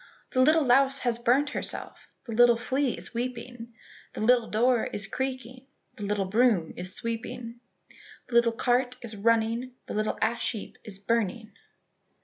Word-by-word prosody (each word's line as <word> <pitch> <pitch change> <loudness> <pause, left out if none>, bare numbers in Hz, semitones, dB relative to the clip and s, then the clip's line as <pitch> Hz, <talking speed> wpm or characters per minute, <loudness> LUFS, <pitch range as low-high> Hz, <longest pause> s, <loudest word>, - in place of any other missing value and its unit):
"The 255 - +2
little 310 +4 +5
louse 270 +2 +4
has 240 -2 0
burnt 260 +5 +2
herself, - - -3 0.2
The 235 - -7
little 240 +1 +5
flea 260 +2 -1
is - - -5
weeping, 240 -1 -5 0.4
The - - -6
little 240 +1 +3
door 240 +2 +2
is 200 - -4
creaking, 255 +2 -5 0.3
The - - -11
little 200 -1 0
broom 210 -4 +2
is 180 +1 -4
sweeping, 230 +1 -5 0.7
The 250 - -12
little 235 0 +5
cart 245 +2 0
is 225 -2 -5
running, 230 +3 +1
The - - -6
little 215 0 -1
ash 230 +3 0
heap 215 - -8
is 210 -4 -4
burning." 220 +1 -1
235 Hz, 155 wpm, -27 LUFS, 220-250 Hz, 0.7 s, little